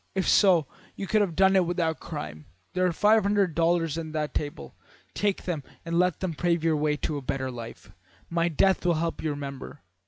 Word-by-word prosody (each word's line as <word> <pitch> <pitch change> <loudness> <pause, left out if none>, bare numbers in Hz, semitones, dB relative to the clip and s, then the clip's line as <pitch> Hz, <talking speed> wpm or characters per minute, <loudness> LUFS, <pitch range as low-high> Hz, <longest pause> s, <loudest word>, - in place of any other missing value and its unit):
If 190 - 0
so, 180 -7 +5 0.3
you 195 - -4
could 215 +2 +2
have 180 -6 -1
had 190 0 +5
it 185 -2 +4
without 170 -2 -1
crime. 75 - -7 0.3
There 185 0 +2
are - - +1
five 210 +5 +4
hundred 200 -3 +1
dollars 165 -1 +1
on 160 -1 -6
that 150 -3 -2
table. 145 - -4 0.4
Take 205 -2 -1
them 170 -5 -2 0.2
and 170 0 0
let 180 -2 +1
them 185 -3 -2
pave 170 +1 0
your 165 -1 +2
way 150 0 0
to 150 0 -2
a - - -5
better 130 0 -3
life. 115 -2 -9 0.4
My 170 0 0
death 190 +4 +2
will 175 -2 +2
help 165 +1 -2
you - - -2
to - - -1
remember.' 140 0 -8
165 Hz, 215 wpm, -27 LUFS, 150-185 Hz, 0.4 s, so